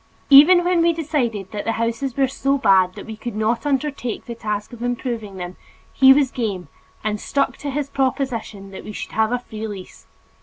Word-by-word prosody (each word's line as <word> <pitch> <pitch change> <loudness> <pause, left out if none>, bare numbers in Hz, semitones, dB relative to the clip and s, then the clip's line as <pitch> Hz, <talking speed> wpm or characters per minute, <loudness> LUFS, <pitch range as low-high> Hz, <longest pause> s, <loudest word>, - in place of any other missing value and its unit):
Even 335 +6 +8
when 350 -1 +2
we 335 0 +3
decided 245 - -2
that 205 -1 -4
the 225 - -1
houses 230 +4 -2
were 270 -1 +3
so 275 +1 0
bad 190 -7 +3
that - - -9
we 220 - -7
could 235 +1 -6
not 225 +5 0
undertake 275 -4 -2
the 235 - -6
task 210 -1 -4
of 235 - -10
improving 240 -4 -3
them, 180 0 -7 0.4
he 265 -1 +7
was 270 -1 +4
game 200 - -3 0.3
and 210 -1 -2
stuck 280 -1 0
to 290 - -5
his 280 +1 -2
proposition 255 -7 -2
that 190 - -9
we 210 - -8
should - - -6
have 220 +1 +1
a 245 - +1
free 220 -3 -7
lease. 195 -3 -10
235 Hz, 200 wpm, -21 LUFS, 210-275 Hz, 0.4 s, Even